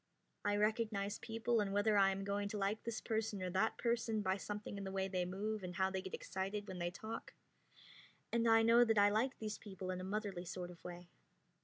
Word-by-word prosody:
I 205 - +2
recognize 210 -1 +1
people 225 +1 0
and 200 -1 -1
whether 205 +1 +3
I 195 -1 +6
am 195 0 -2
going 200 +1 -1
to 210 - -3
like 200 +2 0
this 230 -1 -3
person 220 -2 -1
or 180 - -2
that 190 +5 +1
person 230 -2 0
by 190 0 +2
something 205 0 -5
in - - -4
the 190 - -4
way 190 0 0
they 185 -2 0
move 210 +4 -2
and 180 -1 -5
how 190 +1 +2
they 190 0 -1
get 190 - -5
excited 195 +2 -3
when 185 -1 -5
they 175 0 0
talk; 220 +5 -7 1.0
and 235 0 +2
I 225 0 +7
know 230 +2 +7
that 225 -2 +2
I 205 0 +7
like 245 +6 +1
these 215 -1 -4
people 190 -3 -5
in 185 0 -3
a - - -5
motherly 200 -2 -2
sort 180 0 -5
of 175 - -15
way. 175 0 -8
205 Hz, 225 wpm, -38 LUFS, 190-220 Hz, 1.0 s, I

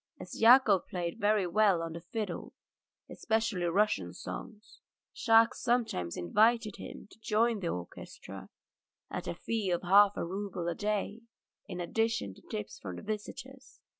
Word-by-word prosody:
As - - -8
Yakov 225 -5 +6
played 175 -3 -4
very 205 -1 +2
well 185 -1 +3
on 165 -1 -5
the 170 - -7
fiddle, 210 +5 -5 0.5
especially 220 -5 -1
Russian 170 - +1
songs, 215 0 -9 0.3
Shahkes 225 -1 +4
sometimes 230 - 0
invited 215 - +2
him - - -9
to - - -18
join 220 +1 +1
the 180 - -3
orchestra 90 - -7 0.6
at - - -5
a - - -3
fee 215 +2 -2
of 175 0 0
half 200 +3 +6
a - - -1
rouble 185 -1 -4
a 175 - 0
day, 210 +3 -2 0.5
in 180 -2 -6
addition 220 - -1
to - - -18
tips 105 - -6
from 95 -3 -7
the - - -9
visitors. 255 +5 -7
205 Hz, 150 wpm, -31 LUFS, 175-225 Hz, 0.6 s, Yakov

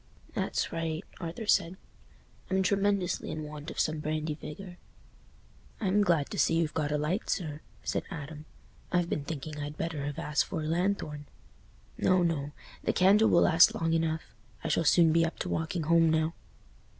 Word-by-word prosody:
"That's - - -1
right," 165 +1 -2 0.2
Arthur 170 +5 -5
said; 185 -3 +2 0.7
"I'm 190 0 +2
tremendously 200 -2 +1
in 155 - -4
want 150 0 -7
of - - -6
some 155 0 +1
brandy 155 0 -2
vigour." 175 +4 -9 1.0
"I'm 205 -1 +2
glad 165 -7 +1
to - - -3
see - - +3
you've 165 -2 +1
got 150 -2 -1
a 150 - +1
light, 155 +8 -1
sir," 155 -4 -2 0.2
said - - -2
Adam. 150 -2 -7 0.5
"I've 175 -1 +1
been 145 - -1
thinking 150 0 -5
I'd 145 +1 -5
better 160 -4 -3
have 145 - -5
asked 150 0 0
for 160 -4 -4
a - - -3
lanthorn." 165 -4 -1 0.7
"No, 185 -1 +3
no; 150 -4 -1 0.3
the - - +1
candle 205 +4 +5
will 170 - +5
last 165 0 +6
long 165 0 0
enough—I 160 -1 -3
shall 165 - +1
soon 165 +1 +5
be 165 0 +4
up 165 - -2
to 180 - -4
walking 160 +1 -1
home 165 +1 +4
now." 160 +1 +1
165 Hz, 175 wpm, -30 LUFS, 150-175 Hz, 1.0 s, last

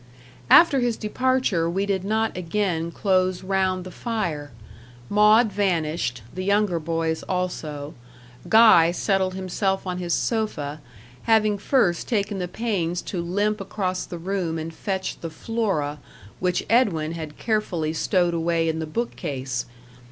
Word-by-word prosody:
After 310 -5 +7
his 240 -2 0
departure 220 -6 +1
we 190 +3 0
did 195 -2 -1
not 220 +2 0
again 175 -2 -1
close 185 0 +1
round 190 -1 0
the 185 - -9
fire. 170 -11 -3 0.6
Maud 210 +2 +5
vanished; 165 - -1
the 185 - -4
younger 200 -3 +2
boys 165 0 -1
also; 155 -5 -3 0.6
Guy 220 -7 +7
settled 190 0 0
himself 190 +1 -1
on 180 -1 -3
his 175 -1 0
sofa, 155 -11 -2 0.4
having 215 -2 +3
first 200 -8 +1
taken 205 -4 -1
the 180 - -2
pains 180 -5 -2
to 175 - -1
limp 205 +4 -1
across 185 -2 -2
the 175 - -6
room 175 -2 -2
and 160 +1 -5
fetch 190 +2 -3
the 165 - -5
Flora, 160 -6 -2 0.4
which 180 -1 0
Edwin 185 -10 +2
had 160 -2 -7
carefully 180 -8 -1
stowed 175 +1 +1
away 165 0 +1
in 160 0 -1
the 160 - -3
book 235 +10 -3
case. 130 -7 -4
185 Hz, 140 wpm, -24 LUFS, 165-210 Hz, 0.6 s, After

